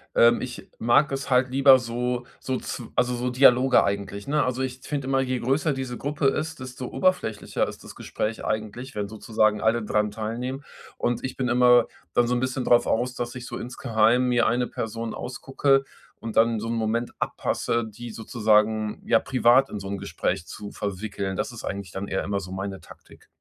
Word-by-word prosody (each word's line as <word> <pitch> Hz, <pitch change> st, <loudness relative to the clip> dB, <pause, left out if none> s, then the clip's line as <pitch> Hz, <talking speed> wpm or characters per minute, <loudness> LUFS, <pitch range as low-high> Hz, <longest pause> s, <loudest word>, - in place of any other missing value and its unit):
ähm, 120 Hz, 0 st, +6 dB
ich 125 Hz, -1 st, -7 dB
mag 120 Hz, +6 st, +4 dB
es 135 Hz, 0 st, -3 dB
halt 130 Hz, 0 st, +3 dB
lieber 135 Hz, 0 st, +7 dB
so 125 Hz, 0 st, -2 dB
so 130 Hz, -, -2 dB
zw 120 Hz, -, -6 dB
also 125 Hz, 0 st, +2 dB
so 125 Hz, +1 st, -1 dB
Dialoge 130 Hz, 0 st, +5 dB
eigentlich, 100 Hz, 0 st, -3 dB
ne? 150 Hz, +1 st, +2 dB
Also, 130 Hz, 0 st, -1 dB
ich 130 Hz, -1 st, -3 dB
finde 140 Hz, -3 st, -4 dB
immer, 135 Hz, 0 st, +2 dB
je 130 Hz, -1 st, -1 dB
größer 135 Hz, +6 st, +1 dB
diese 130 Hz, -2 st, -4 dB
Gruppe 145 Hz, 0 st, -1 dB
ist, 155 Hz, +3 st, -1 dB
desto 130 Hz, 0 st, -7 dB
oberflächlicher 180 Hz, -, 0 dB
ist -, -, -9 dB
das -, -, -11 dB
Gespräch 110 Hz, +1 st, -4 dB
eigentlich, 110 Hz, +5 st, -4 dB
wenn 100 Hz, -1 st, -3 dB
sozusagen 110 Hz, 0 st, +1 dB
alle 110 Hz, +1 st, +2 dB
daran 105 Hz, 0 st, 0 dB
teilnehmen. 120 Hz, +6 st, -4 dB, 0.3 s
Und 120 Hz, 0 st, -1 dB
ich 130 Hz, -, -5 dB
bin 130 Hz, -2 st, -1 dB
immer 125 Hz, -1 st, +5 dB, 0.3 s
dann 120 Hz, -, +3 dB
so 125 Hz, -, +1 dB
'n -, -, +1 dB
bisschen 130 Hz, 0 st, -2 dB
drauf 120 Hz, -1 st, +4 dB
aus, 125 Hz, +2 st, 0 dB
dass 120 Hz, 0 st, -4 dB
ich 125 Hz, -1 st, -7 dB
so 120 Hz, -, -6 dB
insgeheim 120 Hz, 0 st, +1 dB
mir 120 Hz, -1 st, +3 dB
eine 120 Hz, +1 st, +1 dB
Person 115 Hz, -1 st, -4 dB
ausgucke 135 Hz, +2 st, 0 dB, 0.3 s
und 115 Hz, -1 st, -7 dB
dann 115 Hz, -1 st, +3 dB
so 115 Hz, -, -4 dB
'n -, -, -1 dB
Moment 115 Hz, +1 st, -1 dB
abpasse, 115 Hz, 0 st, -1 dB
die 115 Hz, +2 st, -9 dB
sozusagen 110 Hz, -1 st, +1 dB
ja 115 Hz, -, +4 dB
privat 130 Hz, +2 st, +4 dB
in 105 Hz, -, -5 dB
so 95 Hz, -, -6 dB
'n 100 Hz, -, -3 dB
Gespräch 95 Hz, -3 st, -3 dB
zu 105 Hz, -1 st, -8 dB
verwickeln. 100 Hz, -1 st, -4 dB
Das -, -, -2 dB
ist -, -, -8 dB
eigentlich 100 Hz, -2 st, -5 dB
dann 95 Hz, +2 st, -5 dB
eher 95 Hz, -, -1 dB
immer 100 Hz, 0 st, -1 dB
so 90 Hz, -1 st, -8 dB
meine 95 Hz, 0 st, -4 dB
Taktik. -, -, -17 dB
120 Hz, 195 wpm, -25 LUFS, 110-130 Hz, 0.3 s, lieber